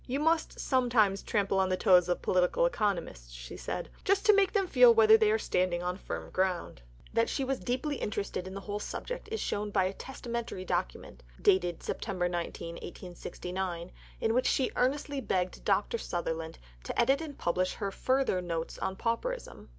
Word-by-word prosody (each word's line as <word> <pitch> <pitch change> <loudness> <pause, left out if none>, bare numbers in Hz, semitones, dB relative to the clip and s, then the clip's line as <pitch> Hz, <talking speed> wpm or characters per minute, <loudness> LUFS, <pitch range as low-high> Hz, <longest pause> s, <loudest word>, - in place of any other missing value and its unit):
"You 265 +2 -1
must 320 +1 +1
sometimes 235 -7 +2
trample 200 -2 0
on 190 -1 +2
the 185 - +1
toes 180 -4 +5
of 175 - -1
Political 185 - +2
Economists," 175 - -1
she - - -8
said, - - -4 0.2
"just 395 +3 +2
to 425 - +7
make 400 -2 +4
them 400 -3 +2
feel 485 +6 +7
whether 440 -1 +7
they 440 -1 +4
are 435 - +3
standing 180 - 0
on 180 0 -1
firm 185 - -6
ground." 185 - -1 0.3
That 230 +1 +2
she 275 - -1
was 265 0 -1
deeply 260 +4 -2
interested 200 -3 -3
in 190 - -7
the 195 - -5
whole 205 +1 -4
subject - - -5
is 445 - -2
shown 210 +1 -2
by 200 -2 +2
a 190 - -1
testamentary 235 -5 -5
document, 175 - -3 0.2
dated 180 -3 +2
September 185 -4 -2
19, 170 -1 -4
1869, 180 0 -6 0.3
in 225 - +1
which 250 +2 +2
she 265 - +2
earnestly 280 +2 0
begged 185 -6 -1
Dr. 205 +3 +1
Sutherland 165 -3 -3 0.3
to - - -4
edit 270 +5 +4
and 300 -4 -7
publish 185 +2 0
her 200 -2 -3
further 260 -4 +1
"Notes 165 -2 -4
on 190 - -2
Pauperism." 250 - -3
200 Hz, 180 wpm, -30 LUFS, 180-270 Hz, 0.3 s, to